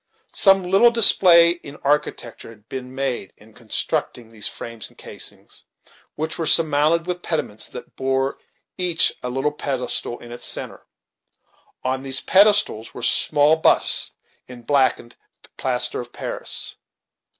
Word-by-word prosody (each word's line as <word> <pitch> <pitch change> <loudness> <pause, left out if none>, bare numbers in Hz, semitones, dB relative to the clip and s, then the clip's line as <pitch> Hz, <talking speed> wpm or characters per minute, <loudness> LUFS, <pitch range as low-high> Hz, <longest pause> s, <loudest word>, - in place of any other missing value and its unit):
Some 195 -1 +5
little 195 +6 +4
display 180 -7 +6
in 160 -5 -8
architecture 145 -6 -2
had 110 -1 -17
been 130 0 -8
made 130 -8 -3
in 110 +1 -20
constructing 115 0 -4
these 105 -3 -4
frames 115 -2 -7
and - - -25
casings, - - -8 0.5
which 160 +1 -4
were 165 - -1
surmounted 155 +1 +2
with 180 0 -4
pediments, 130 -12 -3
that - - -11
bore 135 +1 -1 0.4
each 175 -2 +2
a 125 - -4
little 135 +4 -1
pedestal 125 -4 -3
in 120 - -13
its 120 - -8
centre; - - -2 1.0
on 130 +1 -2
these 135 -1 +1
pedestals 200 - +2
were 125 - -8
small 145 +5 +3
busts 160 - +2 0.3
in 125 -1 -12
blacked 130 -3 0 0.4
plaster 125 -2 0
of 120 0 -12
Paris. - - -6
135 Hz, 135 wpm, -21 LUFS, 120-170 Hz, 1.0 s, display